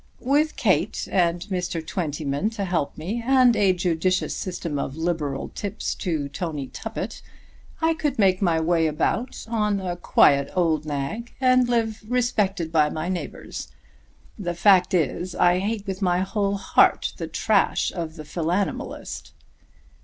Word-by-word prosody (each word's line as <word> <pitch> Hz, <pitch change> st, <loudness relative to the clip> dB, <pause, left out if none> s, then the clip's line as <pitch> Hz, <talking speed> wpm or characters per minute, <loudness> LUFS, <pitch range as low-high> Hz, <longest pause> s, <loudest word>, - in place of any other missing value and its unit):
"With 290 Hz, +4 st, +1 dB
Kate -, -, +1 dB
and 175 Hz, -2 st, +2 dB
Mr. 175 Hz, -3 st, -2 dB
Twentyman 150 Hz, +1 st, -2 dB
to 200 Hz, -, -2 dB
help 170 Hz, -6 st, -1 dB
me, 200 Hz, +10 st, -3 dB
and 255 Hz, -1 st, +5 dB
a 200 Hz, -3 st, +4 dB
judicious 180 Hz, 0 st, 0 dB
system 170 Hz, -5 st, -4 dB
of 135 Hz, -, -3 dB
liberal 160 Hz, -5 st, -2 dB
tips 205 Hz, +1 st, -4 dB
to 160 Hz, -7 st, -2 dB
Tony 145 Hz, -2 st, -4 dB
Tuppett, -, -, -6 dB, 0.6 s
I 325 Hz, 0 st, +4 dB
could 295 Hz, -4 st, -2 dB
make 190 Hz, -3 st, +3 dB
my 170 Hz, -4 st, +2 dB
way 165 Hz, 0 st, +2 dB
about 190 Hz, -, -1 dB
on 210 Hz, -3 st, 0 dB
a 180 Hz, -2 st, -3 dB
quiet 140 Hz, -5 st, +4 dB
old 160 Hz, -4 st, +1 dB
nag, 155 Hz, -, -4 dB
and 255 Hz, -1 st, +4 dB
live 225 Hz, -2 st, 0 dB
respected 210 Hz, -9 st, 0 dB
by 155 Hz, -2 st, +3 dB
my 155 Hz, +3 st, -3 dB
neighbours. 185 Hz, -2 st, -5 dB, 0.7 s
The 175 Hz, -3 st, -3 dB
fact 185 Hz, 0 st, +4 dB
is 175 Hz, +2 st, -1 dB
I 175 Hz, +1 st, +4 dB
hate 205 Hz, +1 st, -2 dB
with 195 Hz, -1 st, -4 dB
my 180 Hz, -1 st, +2 dB
whole 200 Hz, +1 st, 0 dB
heart 195 Hz, -, +3 dB
the 165 Hz, -, -4 dB
trash 215 Hz, +4 st, +1 dB
of 165 Hz, -3 st, -5 dB
the 155 Hz, -2 st, -9 dB
philanimalist." 175 Hz, +5 st, -3 dB
180 Hz, 145 wpm, -24 LUFS, 160-210 Hz, 0.7 s, and